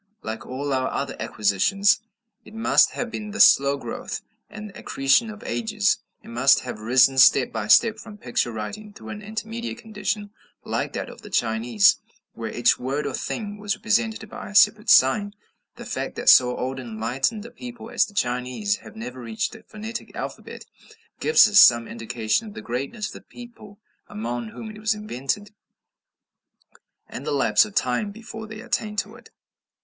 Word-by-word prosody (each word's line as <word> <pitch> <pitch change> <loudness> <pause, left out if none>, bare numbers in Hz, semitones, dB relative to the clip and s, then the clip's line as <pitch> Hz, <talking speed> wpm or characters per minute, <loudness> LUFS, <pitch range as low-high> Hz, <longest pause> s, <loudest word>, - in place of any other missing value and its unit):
Like 110 +1 -6
all 140 +2 -3
our 130 0 0
other - - -3
acquisitions, 195 - +2 0.4
it 215 - -14
must 225 - +4
have 245 -1 -4
been 210 -1 -5
the 215 - -6
slow 140 +1 +6
growth 250 - -6 0.3
and 210 -1 -9
accretion 135 +11 +1
of 215 +1 -10
ages; 215 -4 0 0.2
it - - -13
must 120 +4 +4
have 125 -4 -7
risen 130 +4 +4
step 130 0 +6
by 110 -2 -4
step 220 - +5
from 215 -3 -11
picture 120 -7 -1
writing 205 - -7
through - - -11
an 210 -1 -7
intermediate 225 +3 -5
condition 210 -2 -4 0.3
like - - -3
that - - -4
of - - -12
the - - -11
Chinese, 110 -2 +3 0.4
where 115 -2 -6
each 120 0 +2
word 135 +4 -2
or 140 - -3
thing 205 - -4
was 205 0 -1
represented 225 -1 0
by - - -9
a 205 - -11
separate 215 +1 +5
sign. 205 +10 +5 0.4
The - - -10
fact - - -4
that - - +2
so 125 -1 +6
old 130 +1 -3
and 120 -3 -8
enlightened 130 - -1
a 235 - -10
people 245 0 -10
as - - +2
the 205 - -16
Chinese 125 - -1
have 110 - -14
never 125 +3 -7
reached 115 -2 -3
a 220 - -12
phonetic 220 +2 -8
alphabet, - - -7 0.5
gives 460 - +6
us 210 0 +6
some 120 -1 +7
indication 115 - -2
of 210 - -11
the - - -7
greatness 135 - -4
of - - -11
the - - -11
people 230 -4 -13 0.3
among 120 +2 -4
whom 220 - -8
it 215 - -12
was 215 0 0
invented, 205 0 -4 1.6
and - - -8
the - - -3
lapse 115 -7 +4
of 105 - -12
time 125 +11 0
before 220 +1 -9
they 220 0 -9
attained 210 -1 -3
to 205 +2 -2
it. 240 - -16
200 Hz, 180 wpm, -24 LUFS, -, 1.6 s, some